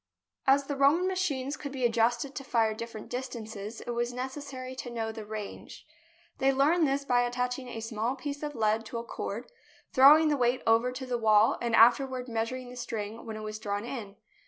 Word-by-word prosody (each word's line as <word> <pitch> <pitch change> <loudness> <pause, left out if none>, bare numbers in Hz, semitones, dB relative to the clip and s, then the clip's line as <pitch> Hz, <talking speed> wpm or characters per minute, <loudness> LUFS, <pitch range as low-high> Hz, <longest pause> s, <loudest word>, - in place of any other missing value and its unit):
As 275 +1 +5
the 285 - -3
Roman 285 +6 +4
machines 305 -8 -1
could 285 -2 -7
be 260 -2 -1
adjusted 235 +3 +1
to 275 - -6
fire 225 -4 +1
different 230 -1 -7
distances, 225 -4 -6
it 240 - -5
was 240 +1 -1
necessary 260 0 -6
to 245 - -5
know 225 -2 -3
the 220 -1 -7
range. 215 -1 -7 0.5
They 270 0 +4
learned 300 +5 +3
this 275 +1 -1
by 245 -2 +3
attaching 250 +1 -2
a 225 -2 -6
small 225 +3 -2
piece 285 +1 -5
of 295 -1 -4
lead 220 0 +1
to 235 - -5
a 230 - -4
cord, 235 - -6 0.4
throwing 300 +4 +8
the 295 - +2
weight 245 0 +1
over 230 +2 +3
to 255 +1 -6
the 245 -2 -2
wall 215 -1 +5
and 235 -1 +1
afterward 250 +2 +4
measuring 245 +2 -3
the 250 - -10
string 225 -2 -5
when 220 -1 -5
it - - -7
was 215 0 -5
drawn 205 0 -3
in. 220 -6 -6
245 Hz, 200 wpm, -29 LUFS, 225-270 Hz, 0.5 s, throwing